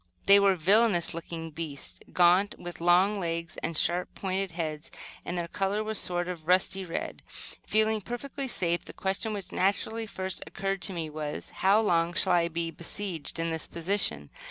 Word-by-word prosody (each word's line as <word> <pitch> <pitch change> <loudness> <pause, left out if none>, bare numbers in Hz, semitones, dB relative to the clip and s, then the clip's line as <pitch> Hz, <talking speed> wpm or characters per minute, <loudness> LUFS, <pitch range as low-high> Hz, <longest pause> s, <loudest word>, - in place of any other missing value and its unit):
They 200 +1 +8
were 200 -1 +4
villainous 190 +1 +5
looking 165 0 -6
beasts, 140 - -5
gaunt, 180 +3 +4
with 175 -1 -8
long 185 +4 +4
legs 165 -2 -3
and 165 -1 -3
sharp, 175 +3 +1
pointed 190 -1 -2
heads; 155 -2 -4 0.3
and 175 - -4
their 170 -1 -2
color 195 +4 -1
was 220 -1 -2
a - - -3
sort 175 0 -1
of 170 -3 -6
rusty 190 +1 +2
red. 170 -2 -5
Feeling 215 0 -1
perfectly 270 +5 -5
safe, 175 -7 0
the - - -9
question 195 +3 -2
which 200 -3 -6
naturally 220 +4 0
first 190 -2 -5
occurred 195 -1 -3
to 195 - +4
me 160 -3 -4
was, 150 -1 -5
"how 195 +3 +3
long 170 -5 +2
shall 185 +1 +3
I 170 -1 +3
be 165 0 -3
besieged 170 0 -5
in 165 0 -1
this 160 -1 -3
position?" 170 - -1
180 Hz, 180 wpm, -28 LUFS, 165-200 Hz, 0.3 s, They